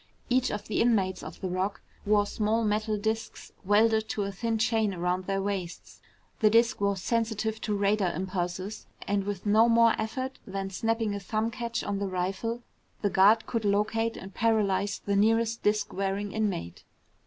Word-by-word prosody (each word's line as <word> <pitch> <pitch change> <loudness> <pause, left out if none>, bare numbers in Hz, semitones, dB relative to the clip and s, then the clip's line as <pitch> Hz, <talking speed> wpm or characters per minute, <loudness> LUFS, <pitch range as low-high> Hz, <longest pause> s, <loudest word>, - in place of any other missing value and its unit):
Each 255 0 +3
of 210 - -5
the 215 - 0
inmates 195 -6 +2
of - - -9
the 190 - -2
Rock 185 +2 -2 0.3
wore 205 -1 +4
small 215 +2 0
metal 215 0 0
disks 220 +2 -3
welded 220 +2 +3
to 205 - -1
a 200 - -3
thin 225 +3 -2
chain 220 -2 +1
around 180 +1 -1
their 195 0 0
waists. 195 -4 -5 0.4
The 215 - +5
disk 230 +1 +3
was 200 -1 +1
sensitive 220 -1 -1
to 210 -1 -1
radar 200 -2 +2
impulses, 185 +3 -4 0.2
and 200 0 +1
with 205 -1 -4
no 220 +3 +5
more 230 0 +5
effort 260 +4 -4
than 195 0 -4
snapping 225 +1 0
a 200 - -3
thumb 215 +4 -2
catch 235 0 -3
on 200 -1 -2
the 200 - -1
rifle, 195 +6 -2 0.4
the 205 - +2
guard 205 +4 +5
could 230 -2 -2
locate 220 +3 +1
and 190 0 -9
paralyze 205 -3 +1
the 200 - +1
nearest 225 +2 +2
disk 210 0 0
wearing 195 +1 -2
inmate. 200 - -3
210 Hz, 175 wpm, -28 LUFS, 195-225 Hz, 0.4 s, The